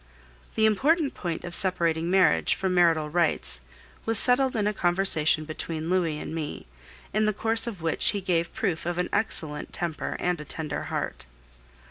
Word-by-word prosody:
The 220 Hz, -, +3 dB
important 285 Hz, -, +2 dB
point 170 Hz, -3 st, -4 dB
of 175 Hz, -, -7 dB
separating 170 Hz, -3 st, +1 dB
marriage 190 Hz, 0 st, +3 dB
from 190 Hz, -1 st, -1 dB
marital 165 Hz, -3 st, +3 dB
rights 165 Hz, -, 0 dB, 0.4 s
was 225 Hz, -1 st, +3 dB
settled 255 Hz, +2 st, +4 dB
in 210 Hz, -2 st, 0 dB
a 210 Hz, -, +1 dB
conversation 175 Hz, -5 st, +1 dB
between 160 Hz, +1 st, -4 dB
Louis 170 Hz, -5 st, +1 dB
and 155 Hz, -, -6 dB
me, 155 Hz, -2 st, -5 dB, 0.5 s
in 215 Hz, +1 st, +2 dB
the 215 Hz, -, +1 dB
course 225 Hz, +3 st, 0 dB
of 195 Hz, -8 st, -6 dB
which 165 Hz, -, +2 dB
he 205 Hz, -, -1 dB
gave 175 Hz, -3 st, 0 dB
proof 180 Hz, -9 st, -2 dB
of 175 Hz, 0 st, -2 dB
an 180 Hz, -, -1 dB
excellent 155 Hz, -8 st, 0 dB
temper 170 Hz, -3 st, -3 dB
and 180 Hz, -3 st, -1 dB
a -, -, -6 dB
tender 150 Hz, -1 st, -4 dB
heart. -, -, -4 dB
175 Hz, 170 wpm, -26 LUFS, 160-210 Hz, 0.5 s, settled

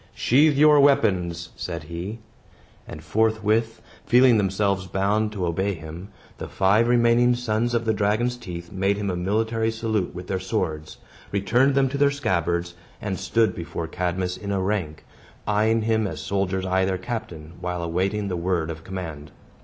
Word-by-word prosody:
"Sheathe 145 Hz, +3 st, +3 dB
your 150 Hz, 0 st, +6 dB
weapons!" 90 Hz, -12 st, +2 dB
said 85 Hz, -3 st, -5 dB
he. 85 Hz, +7 st, -6 dB, 0.7 s
And -, -, -9 dB
forthwith, 110 Hz, +1 st, 0 dB, 0.2 s
feeling 125 Hz, -2 st, +5 dB
themselves 95 Hz, -1 st, 0 dB
bound 105 Hz, +3 st, 0 dB
to 95 Hz, -4 st, -2 dB
obey 95 Hz, +4 st, -1 dB
him, 80 Hz, +3 st, -9 dB, 0.3 s
the -, -, -5 dB
five 105 Hz, +5 st, +2 dB
remaining 120 Hz, 0 st, +4 dB
sons 120 Hz, 0 st, -1 dB
of 115 Hz, 0 st, 0 dB
the 110 Hz, -, +2 dB
dragon's 110 Hz, +4 st, +1 dB
teeth 85 Hz, -7 st, -8 dB
made 100 Hz, +1 st, 0 dB
him 100 Hz, -2 st, -2 dB
a -, -, -2 dB
military 110 Hz, +5 st, 0 dB
salute 110 Hz, -5 st, -2 dB
with 90 Hz, 0 st, -7 dB
their 95 Hz, 0 st, -2 dB
swords, 80 Hz, -4 st, -3 dB, 0.3 s
returned 120 Hz, +8 st, +2 dB
them 135 Hz, -1 st, +3 dB
to 140 Hz, +2 st, -4 dB
the 145 Hz, 0 st, +5 dB
scabbards, 85 Hz, -10 st, -1 dB, 0.3 s
and 100 Hz, -3 st, -4 dB
stood 110 Hz, +5 st, +1 dB
before 85 Hz, -1 st, -5 dB
Cadmus 90 Hz, +2 st, -2 dB
in 100 Hz, -1 st, -5 dB
a 100 Hz, -, 0 dB
rank, 95 Hz, -6 st, -2 dB, 0.4 s
eyeing 110 Hz, +2 st, +2 dB
him 110 Hz, -1 st, +1 dB
as -, -, -6 dB
soldiers 95 Hz, -1 st, -1 dB
eye 95 Hz, 0 st, +1 dB
their 95 Hz, 0 st, 0 dB
captain, 90 Hz, -7 st, -6 dB
while 90 Hz, -1 st, -3 dB
awaiting 95 Hz, +5 st, -1 dB
the 95 Hz, -, -2 dB
word 85 Hz, -2 st, -1 dB
of 80 Hz, 0 st, -9 dB
command. 80 Hz, -6 st, -7 dB
100 Hz, 165 wpm, -24 LUFS, 90-115 Hz, 0.7 s, your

